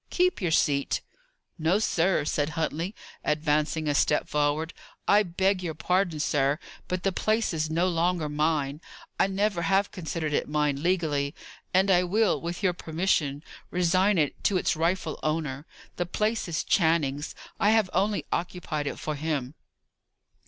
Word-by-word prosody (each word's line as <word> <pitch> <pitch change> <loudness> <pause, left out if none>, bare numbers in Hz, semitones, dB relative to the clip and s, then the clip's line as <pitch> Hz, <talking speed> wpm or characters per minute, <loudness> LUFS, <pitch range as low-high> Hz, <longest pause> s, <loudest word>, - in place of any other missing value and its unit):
Keep 365 - +1
your 175 - +1
seat." 145 -3 +2 0.6
"No, 165 +5 +3
sir," 175 -6 +1
said 145 0 0
Huntley, 165 +5 -2 0.3
advancing 150 +1 0
a 145 - +2
step 150 +1 +2
forward. 150 +2 0 0.3
"I 205 - +6
beg 190 0 +1
your 165 -3 -4
pardon, 180 0 0
sir, 145 -1 +1 0.3
but 185 0 -2
the 195 - +2
place 215 +2 0
is 155 -1 -1
no 170 +3 +1
longer 170 -2 +1
mine. 150 -1 0 0.4
I - - +4
never 195 -1 0
have 195 +4 +2
considered 160 -4 -3
it - - 0
mine 150 -2 0
legally, 155 -5 0 0.4
and 190 +2 +3
I 180 -1 +5
will, 185 -4 +2
with 170 +4 -5
your 185 -2 +3
permission, 160 -4 -1 0.3
resign 185 +3 +2
it 150 -3 0
to 195 - +3
its - - +1
rightful 165 0 -1
owner. 155 -2 -2 0.3
The 175 - -1
place 215 +4 -1
is 170 -1 -1
Channing's; 160 -5 +1 0.2
I 205 - +4
have 220 -2 +4
only 200 +3 +1
occupied 170 -4 -3
it - - -3
for 155 - -3
him." 145 -3 -2
165 Hz, 155 wpm, -27 LUFS, 150-185 Hz, 0.6 s, I